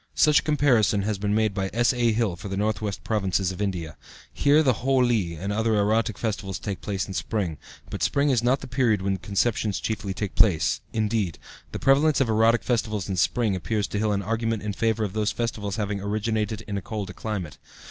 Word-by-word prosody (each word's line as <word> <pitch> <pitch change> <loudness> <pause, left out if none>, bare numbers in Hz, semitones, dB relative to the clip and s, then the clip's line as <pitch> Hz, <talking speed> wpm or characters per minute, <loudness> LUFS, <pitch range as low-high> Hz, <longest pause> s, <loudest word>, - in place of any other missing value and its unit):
Such 150 -1 +5
a - - -4
comparison 125 -9 +2
has 105 -1 -2
been 105 +1 0
made 110 -2 +2
by 95 -1 -2
S.A. 120 0 +2
Hill 110 -5 0
for 90 +4 -8
the 95 0 -4
Northwest 105 -1 -2
Provinces 95 -3 0
of 95 - -7
India. 90 -6 -3 0.4
Here 145 +2 +4
the 130 -6 +1
Holi 120 -10 +2
and 100 +5 -3
other 110 +1 +1
erotic 110 +1 +1
festivals 100 -4 -3
take 100 0 -5
place 100 -2 -3
in 95 - -6
spring; 90 -5 -2 0.3
but - - -6
spring 140 0 +2
is 125 -3 +2
not 125 +3 +2
the 135 - -7
period 120 -5 +1
when 95 0 0
conceptions 100 +1 0
chiefly 100 -3 -3
take 105 -3 -3
place; 95 -8 +3
indeed, 105 -5 -1 0.3
the - - -4
prevalence 140 +2 +3
of 135 -4 +2
erotic 115 +1 +3
festivals 110 -5 -1
in 95 - -1
spring 105 +3 +1
appears 100 +4 -1
to 100 - -2
Hill 105 0 +1
an 100 -1 -1
argument 115 0 -1
in 105 -1 -2
favor 110 +1 0
of 100 -3 -3
those 105 0 0
festivals 105 -4 -3
having 100 -2 -2
originated 110 +1 -1
in 100 -1 -3
a - - -10
colder 100 -4 -5
climate. 95 -8 -5
105 Hz, 205 wpm, -25 LUFS, 100-115 Hz, 0.4 s, Such